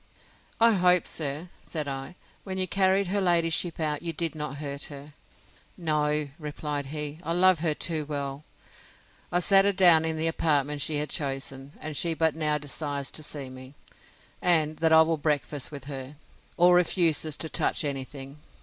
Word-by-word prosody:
I 230 0 +7
hope, 180 -3 +4
sir, 150 +3 -4
said 155 -3 -4
I, 135 +3 -5 0.3
when 190 -1 -5
you 185 0 0
carried 190 +1 +2
her 200 +1 0
ladyship 170 -1 +1
out, 150 -2 -1
you 170 - -2
did 165 -1 -2
not 150 -2 -5
hurt 140 -1 -5
her. 145 -1 -10 0.6
No, 150 -3 0
replied 150 -2 -4
he, 150 +1 -5
I 165 -2 -2
love 185 -1 +5
her 155 -2 +1
too 155 -2 -1
well. 140 -1 -4 0.9
I 175 - +3
set 195 +2 +6
her 200 - +3
down 175 -4 +6
in 160 -1 -1
the 160 - 0
apartment 150 -3 +1
she 155 - +1
had 150 +1 -2
chosen: 135 -1 -4
and 155 -1 -5
she 165 +2 +1
but 160 -1 +1
now 150 -1 +1
desires 145 -1 -4
to - - -6
see 145 -2 -5
me, 130 +2 -12 0.7
and 155 -3 +2
that 160 0 +2
I 160 0 +8
will 165 0 0
breakfast 145 -2 -2
with 140 -3 -7
her, 135 0 -7 0.4
or 175 +1 +6
refuses 165 -3 +2
to 160 - -4
touch - - 0
any 140 -2 -2
thing. 135 +1 -10
155 Hz, 175 wpm, -27 LUFS, 145-170 Hz, 0.9 s, I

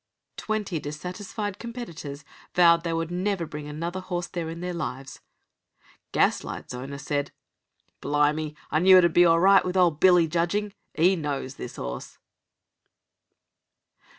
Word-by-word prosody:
Twenty 210 -6 -2
dissatisfied 185 +7 -5
competitors 170 - -7 0.3
vowed 170 -1 +5
they 170 - -2
would 165 0 -2
never 185 0 -1
bring 150 -1 -7
another 165 +5 -4
horse 180 -1 -3
there 170 -2 -5
in 165 +1 -7
their 180 0 -4
lives. 135 -5 -5 0.9
Gaslight's - - 0
owner 135 +3 -6
said: 145 0 -2 0.7
"Blimey, 150 +1 0 0.2
I 155 - +2
knew 185 +2 +7
it 180 - +6
would 170 -2 +3
be 175 - +6
all 165 0 +5
right 195 +2 +6
with 185 +1 -2
old 170 -5 +3
Billy 180 -2 +5
judging. 175 +5 -1 0.2
'E 180 +4 +4
knows 140 -5 -4
this 125 - -8
'orse." 60 0 -6
170 Hz, 140 wpm, -26 LUFS, 150-185 Hz, 0.9 s, knew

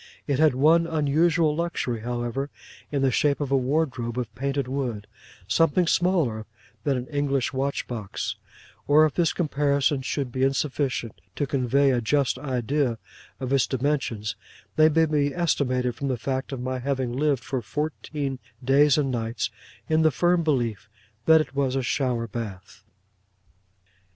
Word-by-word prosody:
It 140 -2 0
had 155 -4 +4
one 160 +5 +4
unusual 160 +1 +2
luxury, 155 -8 -2
however, 120 +4 -3 0.4
in 140 -2 0
the 135 - +3
shape 140 +3 +2
of 145 -2 -3
a - - +4
wardrobe 130 -3 0
of 120 -3 -3
painted 140 +1 -2
wood, 125 -6 -3 0.4
something 165 - +3
smaller 160 - +1 0.4
than 140 -3 +1
an 125 - -4
English 140 -3 0
watch 135 +1 -1
box; 110 -5 -4 0.5
or 150 +2 +6
if 155 - -1
this 170 -3 +2
comparison 140 -3 +1
should 135 -1 -3
be 130 - -3
insufficient 135 -3 -1
to 145 - 0
convey 135 +1 +2
a 125 -2 +1
just 130 +1 +1
idea 130 -1 -1 0.4
of 130 0 -2
its 135 - +3
dimensions, 125 -7 -1 0.4
they 155 0 +6
may 160 +1 +3
be 145 -2 0
estimated 130 -7 +1
from 140 - -4
the 130 -2 0
fact 130 +3 -3
of 135 - -4
my 130 +1 -3
having 130 -2 -2
lived 140 -1 +1
for 130 -2 -3
fourteen 145 +2 -3 0.2
days 140 +2 +5
and 140 -3 +1
nights 115 -2 -2 0.4
in 160 0 +3
the 160 - +5
firm 175 +6 +2
belief 120 -9 -1 0.4
that 160 0 +7
it 155 - -6
was 135 -2 0
a 135 - 0
shower 125 -3 0
bath. 105 -2 -7
135 Hz, 155 wpm, -25 LUFS, 125-150 Hz, 0.5 s, that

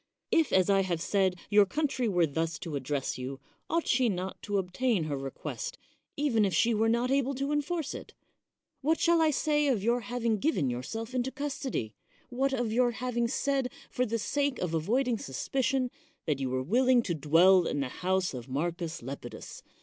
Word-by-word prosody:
If, 325 -5 +3
as 185 -1 +4
I 195 -1 +4
have 180 -3 -1
said, 190 +1 +1 0.2
your 205 -1 +6
country 275 -2 0
were 175 -4 +3
thus 165 +2 -2
to 155 0 -5
address 135 -1 -2
you, 130 +2 -5 0.3
ought 335 0 +1
she 245 -1 +3
not 185 -1 -4
to 205 -1 -1
obtain 195 +2 0
her 150 -2 -2
request, 135 0 -5 0.4
•even 270 -7 +2
if 195 -3 +1
jshe 235 - +3
were 220 +1 +2
not 240 +2 +1
able 275 0 +1
to 275 +2 -2
enforce 295 +1 -1
it? - - -9 0.7
What 315 +4 +2
shall 340 -1 +4
I 320 - +4
say 295 0 +1
of 235 -8 +1
your 235 +2 +2
having 235 -1 -1
given 175 - +1
yourself 225 - -5
into 255 0 0
custody? 265 - -3 0.4
what 270 +2 0
of 245 -4 -1
your 245 0 +3
having 240 0 -1
said, 270 0 0 0.2
for 250 0 0
the 230 +1 -1
sake 285 +4 0
of 180 -2 -2
avoiding 230 - +1
suspicion, 255 - -1 0.3
that 150 -3 0
you 135 -1 -1
were 130 0 -1
willing 245 - +3
to 180 - -1
dwell 165 +4 +5
in 145 - -1
the 135 - -2
house 185 -1 +1
of 125 0 -7
Marcus 165 +2 -3
Lepidus? 130 -1 -8
225 Hz, 190 wpm, -29 LUFS, 165-260 Hz, 0.7 s, your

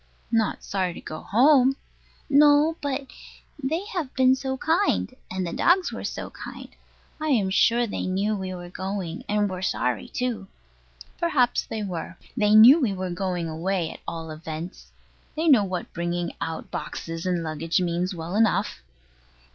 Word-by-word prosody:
Not 225 -2 +1
sorry 185 -3 -2
to - - -8
go 155 - -7
home? 265 +3 +4 0.5
No, 295 +2 +5
but 280 -1 -2 0.6
They 320 +8 -1
have 325 -8 -2
been 260 0 +5
so 265 0 -3
kind; 325 -1 +1 0.2
and 185 0 -2
the 170 - -4
dogs 355 +1 +3
were - - -6
so - - -5
kind. - - -9 0.5
I 310 - -2
am 215 -10 +2
sure 235 +4 +3
they 205 - -3
knew 200 +3 0
we 190 -2 -4
were 175 -1 -8
going, 190 -3 -4
and 210 0 +2
were 185 -2 -5
sorry 125 - -1
too. 235 -6 -3 0.7
Perhaps 270 -8 +2
they 220 -1 -4
were. 180 -2 -5 0.2
They 210 -3 +3
knew 250 +9 +9
we 225 -7 +1
were 185 -1 -4
going 175 -1 -2
away, 165 +2 -2
at - - -11
all 165 -1 -5
events. 160 +3 -7 0.5
They 320 +2 -1
know 260 -9 +6
what 185 -2 -4
bringing 175 0 -2
out 165 -1 -4
boxes 165 +1 -5
and 175 -2 0
luggage 160 +2 -1
means 180 +1 -1
well 165 +3 -5
enough. 210 - +1
195 Hz, 165 wpm, -25 LUFS, 175-260 Hz, 0.7 s, knew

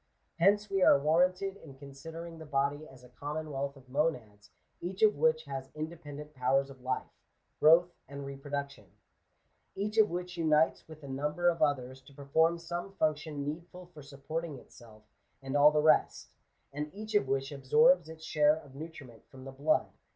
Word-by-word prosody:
Henoe 195 +5 +6
we 195 -1 +1
are. 180 - +7
warranted 180 +6 +1
in 140 -7 -13
considering 165 +4 -9
the 160 - -9
body 145 +1 -1
as 130 -1 -16
a 125 - -15
common 150 +4 -5
wealth 140 0 -3
of 130 -1 -18
monads, 125 -8 -2 0.3
each 185 +4 -3
of 215 -1 +6
which 155 +1 +2
has 135 -1 -6
independent 150 -2 -7
powers 135 +1 +1
of 130 -2 -15
life, 130 0 -3 0.5
growth, 170 +3 +6
and 140 +1 -7
reproduction; 140 -4 -6 0.9
each 210 +3 -1
of 215 - +6
which 180 +1 -5
unites 160 -1 +2
with 155 -1 -13
a - - -8
number 150 +6 0
of 170 -1 -2
others 130 -3 0
to 135 +1 -18
perform 160 +4 +2
some 175 +3 -5
funotion 155 -4 -1
needful 175 +4 -7
for 150 - -11
supporting 145 +2 -6
itself 110 -3 -16 0.4
and 135 0 -5
all 145 +1 +8
the 150 0 +1
rest; 155 - +3 0.4
and 150 +1 -4
each 215 +1 -7
of 205 -10 +3
which 135 +1 -1
absorbs 170 - +4
its 160 0 -11
share 150 -1 +4
of 145 -3 -13
nutri 155 +1 -9
ment 115 -3 -17
from 130 -1 -13
the 135 - -7
blood. 145 +4 +1
150 Hz, 175 wpm, -31 LUFS, 135-165 Hz, 0.9 s, all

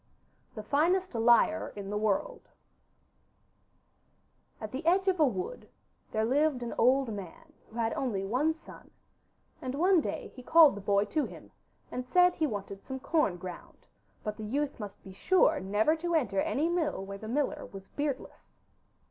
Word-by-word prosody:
THE 215 - -6
FINEST 345 - +1
LIAR 235 +7 +3
IN 200 -1 -6
THE 210 - -1
WORLD 220 - -1 2.1
At 215 -1 -6
the 265 +5 -5
edge 370 +4 +3
of 375 -2 +2
a 305 - +6
wood 390 - -5 0.4
there 220 0 +1
lived 275 +1 +1
an 235 - -4
old 255 0 +3
man 205 - -9 0.2
who 225 - -16
had 225 -1 0
only 205 -7 -2
one 280 +10 +1
son, 325 - -14 0.7
and 255 0 -4
one 355 +3 +4
day - - -4
he 255 - -9
called 320 +4 +7
the 205 - -7
boy 200 +1 +2
to 285 +8 -1
him - - -12 0.4
and 250 - -3
said 360 +7 +4
he 315 -3 0
wanted 200 -4 -6
some 265 0 -6
corn 270 - +1
ground, 180 0 -10 0.4
but 210 0 -4
the 215 - -7
youth 280 +6 -2
must 205 -2 -8
be 190 - -11
sure 320 - +3
never 210 +10 +2
to 340 +1 -1
enter 200 -11 +1
any 305 +4 0
mill 325 - -1
where 200 0 -7
the 220 - -8
miller 275 +5 -1
was 195 -1 -10
beardless. 285 -2 -5
260 Hz, 170 wpm, -30 LUFS, 210-315 Hz, 2.1 s, called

